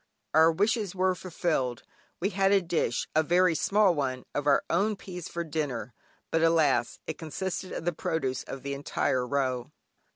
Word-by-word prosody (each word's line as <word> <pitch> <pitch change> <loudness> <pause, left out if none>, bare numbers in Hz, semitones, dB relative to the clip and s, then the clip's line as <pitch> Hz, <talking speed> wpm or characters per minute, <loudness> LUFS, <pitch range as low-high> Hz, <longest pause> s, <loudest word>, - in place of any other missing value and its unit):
Our 160 +1 +6
wishes 205 +2 0
were 185 0 +2
fulfilled; 160 -9 -2 0.4
we 195 +4 0
had 195 +1 +2
a 200 - +6
dish, 170 -9 -1
(a 155 - +6
very 175 +2 +3
small 200 +3 +3
one) 130 -4 -2
of 145 0 -2
our 140 - +4
own 210 +1 +1
peas 180 -3 -8
for 170 - -3
dinner, 140 -8 -3 0.4
but 165 - +2
alas 155 -7 +3
it 160 - -5
consisted 185 +3 -4
of - - -5
the 175 - +1
produce 145 -5 -2
of 135 - -8
the 140 0 -3
entire 130 -2 -1
row. 130 -2 -1
160 Hz, 170 wpm, -28 LUFS, 140-185 Hz, 0.4 s, Our